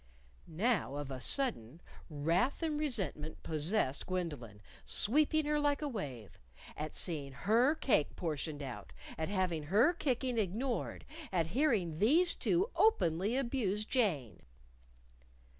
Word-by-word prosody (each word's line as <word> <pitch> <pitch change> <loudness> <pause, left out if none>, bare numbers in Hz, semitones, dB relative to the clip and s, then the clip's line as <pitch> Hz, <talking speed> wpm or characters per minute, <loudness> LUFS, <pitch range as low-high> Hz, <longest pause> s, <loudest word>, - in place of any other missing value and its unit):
Now, 175 - 0
of 145 -1 -5
a 130 -1 -6
sudden, 170 - +3 0.3
wrath 165 - 0
and 305 -2 -1
resentment 195 - -2
possessed 155 -2 -1
Gwendolyn, 145 - -5 0.2
sweeping 305 +6 +2
her 300 0 +1
like 290 0 0
a - - -1
wave 135 - -7 0.4
at 155 +1 -6
seeing 145 -6 -3
her 230 - +2
cake 235 - +1
portioned 155 -3 -4
out; 130 -3 -8 0.2
at 160 +1 -3
having 185 -5 -1
her 215 - +4
kicking 255 -6 -1
ignored; 225 +6 -2 0.3
at 170 -3 +1
hearing 215 - +1
these 330 - +4
two 370 +7 0
openly 195 - +2
abuse 235 -6 -1
Jane. 155 - -1
195 Hz, 125 wpm, -33 LUFS, -, 0.4 s, her